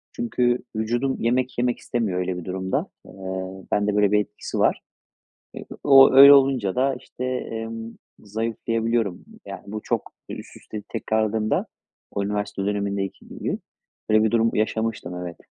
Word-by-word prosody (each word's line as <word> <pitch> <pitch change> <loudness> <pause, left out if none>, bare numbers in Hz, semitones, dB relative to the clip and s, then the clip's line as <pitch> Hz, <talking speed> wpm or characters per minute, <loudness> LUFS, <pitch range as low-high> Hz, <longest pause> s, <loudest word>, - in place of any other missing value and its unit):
Çünkü 125 - +1 0.2
vücudum 120 +5 0
yemek 125 +2 0
yemek 120 0 0
istemiyor 105 -7 -1
öyle 90 0 -2
bir 90 - -7
durumda. 95 0 -2 0.2
Eee, - - -13 0.6
bende 105 0 +1
böyle 105 -1 +3
bir 105 - +4
etkisi 105 - -5
var. - - +2 0.7
Eee, - - -8 0.2
o 135 -2 +8
öyle 140 +1 +11
olunca 130 -8 +3
da, 135 +1 +2
işte, 125 - -7
emm, 115 -2 -4 0.3
zayıflayabiliyorum. 115 -1 -2 0.2
Yani, - - -7
bu 105 +1 -5
çok, - - -2 0.2
eee, - - -4
üst - - -11
üste 105 -1 -8
tekrarladığında 110 -1 0 0.5
o 100 - -2
üniversite 105 -1 -3
dönemindeki 100 -1 -2
gibi. - - -4 0.5
Öyle 110 0 +5
bir 110 - +2
durum 115 0 +3
yaşamıştım, 110 -4 -1
evet. 85 -1 -7
110 Hz, 145 wpm, -24 LUFS, 105-120 Hz, 0.7 s, öyle